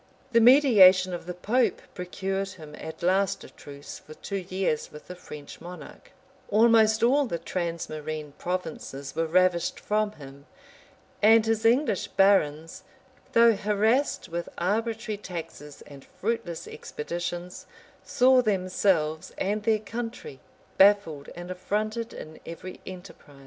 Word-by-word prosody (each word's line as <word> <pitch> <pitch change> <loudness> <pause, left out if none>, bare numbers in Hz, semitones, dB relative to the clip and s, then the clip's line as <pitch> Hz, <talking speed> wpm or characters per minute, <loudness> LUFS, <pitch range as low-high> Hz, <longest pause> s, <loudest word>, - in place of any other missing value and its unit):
The 230 -1 +5
mediation 205 -8 +7
of 175 -1 -6
the 180 - -5
pope 235 +8 +1
procured 195 +2 -4
him 155 -5 -12
at 160 +1 -8
last 195 +2 +1
a - - -11
truce 145 0 -11
for 155 - -13
two 200 - -5
years 185 -4 -2
with 150 - -12
the 180 - -8
French 150 -5 -11
monarch;[*] 180 - -11 0.4
almost 220 0 +4
all 275 +3 +4
the 170 - -3
transmarine 155 -4 -4
provinces 160 -6 -5
were 165 0 0
ravished 180 0 +2
from 210 0 0
him; 140 -2 -13 0.7
and 220 +1 +6
his 225 0 0
English 235 - +2
barons, 165 -5 +2 0.5
though 230 0 +6
harassed 215 +7 +1
with 170 +1 -5
arbitrary 220 +3 -1
taxes 160 -6 -8
and 140 -2 -13
fruitless 215 -6 -4
expeditions, 175 +3 -6 0.4
saw 255 0 +4
themselves 185 -6 0
and 205 +2 -1
their 220 0 +2
country 225 - -7 0.4
baffled 190 -8 +4
and 175 +1 -7
affronted 215 +5 -3
in 155 0 -10
every 180 +2 -9
enterprise. 180 -6 -11
185 Hz, 130 wpm, -26 LUFS, 165-215 Hz, 0.7 s, mediation